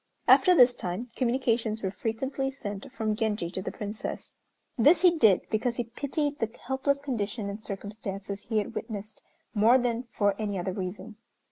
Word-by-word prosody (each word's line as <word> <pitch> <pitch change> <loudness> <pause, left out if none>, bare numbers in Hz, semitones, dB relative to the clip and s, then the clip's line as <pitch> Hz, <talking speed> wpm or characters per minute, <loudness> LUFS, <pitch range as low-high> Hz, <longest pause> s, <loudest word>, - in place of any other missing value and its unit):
After 365 -1 +7
this 250 -4 +7
time 185 +7 -4
communications 235 -3 0
were 190 - 0
frequently 265 +6 -2
sent 205 -7 -7
from 220 -4 -1
Genji 210 -6 -1
to 185 - -3
the 190 - -4
Princess. 210 +1 -5 0.4
This 300 +7 +5
he 355 -2 +6
did 220 - +5
because 235 +2 0
he 240 - -1
pitied 285 +5 -3
the 225 - 0 0.2
helpless 270 +2 +1
condition 220 -6 -3
and 210 +2 -8
circumstances 200 -1 -6
he 220 - +1
had 210 - -1
witnessed 215 -1 -6 0.3
more 225 +3 +6
than 245 -1 -1
for 205 -3 +2
any 205 -2 -2
other 180 +1 -2
reason. 195 +3 -6
220 Hz, 165 wpm, -28 LUFS, 205-255 Hz, 0.4 s, After